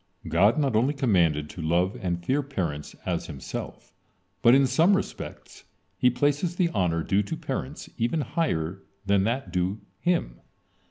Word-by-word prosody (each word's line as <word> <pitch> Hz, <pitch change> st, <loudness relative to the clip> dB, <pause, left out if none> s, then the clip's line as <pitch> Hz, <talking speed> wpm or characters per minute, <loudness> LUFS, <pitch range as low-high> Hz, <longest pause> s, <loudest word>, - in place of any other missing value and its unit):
God 100 Hz, -, +4 dB
not 140 Hz, -6 st, +1 dB
only 130 Hz, +7 st, +2 dB
commanded 85 Hz, -, +2 dB
to 85 Hz, -, -8 dB
love 85 Hz, +4 st, +1 dB
and 85 Hz, -1 st, -2 dB
fear 140 Hz, +7 st, +2 dB
parents 85 Hz, -, -4 dB
as -, -, -2 dB
Himself, -, -, -7 dB, 0.5 s
but 120 Hz, +2 st, +7 dB
in 135 Hz, 0 st, +5 dB
some 165 Hz, +10 st, +4 dB
respects 200 Hz, -, -7 dB, 0.3 s
He 125 Hz, -, +4 dB
places 145 Hz, +7 st, 0 dB
the 180 Hz, -2 st, +2 dB
honor 85 Hz, -, 0 dB
due 95 Hz, +4 st, +2 dB
to 100 Hz, -, -4 dB
parents -, -, -5 dB
even 120 Hz, +7 st, +1 dB
higher 95 Hz, -, -1 dB, 0.2 s
than 100 Hz, 0 st, +3 dB
that 115 Hz, -5 st, -2 dB
due 90 Hz, +3 st, -1 dB, 0.2 s
Him. 170 Hz, -, 0 dB
105 Hz, 155 wpm, -26 LUFS, 85-140 Hz, 0.5 s, but